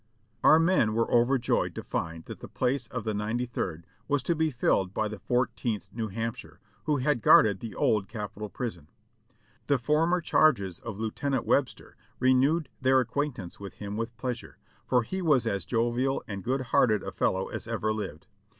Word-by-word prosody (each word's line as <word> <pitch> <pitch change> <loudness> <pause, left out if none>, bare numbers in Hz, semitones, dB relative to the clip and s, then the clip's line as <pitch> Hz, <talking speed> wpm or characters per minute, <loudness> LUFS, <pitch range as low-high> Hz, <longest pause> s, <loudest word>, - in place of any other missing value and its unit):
Our 155 - +8
men 165 -10 +3
were 115 0 +1
overjoyed 120 +1 +2
to - - -5
find 80 0 -4
that - - -8
the - - -9
place 130 -1 -1
of 125 +1 -5
the 110 - -2
Ninety 110 +4 -1
third 85 -8 -4 0.2
was 145 -3 +1
to 170 - +1
be 160 0 +1
filled 100 -7 0
by 110 - +1
the 105 -1 -7
Fourteenth 120 -4 -1
New 115 -1 -3
Hampshire, 115 +4 -5 0.3
who 150 -2 +2
had 135 -2 +1
guarded 100 -2 +6
the 115 +1 -7
Old 105 -3 +1
Capitol 105 -1 -6
Prison. 90 - -6 0.8
The 140 - +3
former 155 +8 +2
charges 115 - +2
of 110 -4 -7
Lieu 110 -1 -2
tenant 140 +2 -1
Webster 140 -2 0 0.2
renewed 135 +5 +3
their 130 0 +4
acquaintance 130 -7 -3
with 100 -2 -8
him 100 0 -6
with 115 +1 -4
pleas 125 -2 -3
ure, - - -15 0.3
for 125 -2 +3
he 190 +11 -4
was 150 -8 +3
as 100 -4 -1
jovial 120 +4 0
and 100 -2 -5
good 130 +3 0
hearted 110 -4 +4
a - - -5
fellow 95 0 0
as - - -6
ever 110 - -1
lived. 95 -7 -6
120 Hz, 185 wpm, -28 LUFS, 105-135 Hz, 0.8 s, Our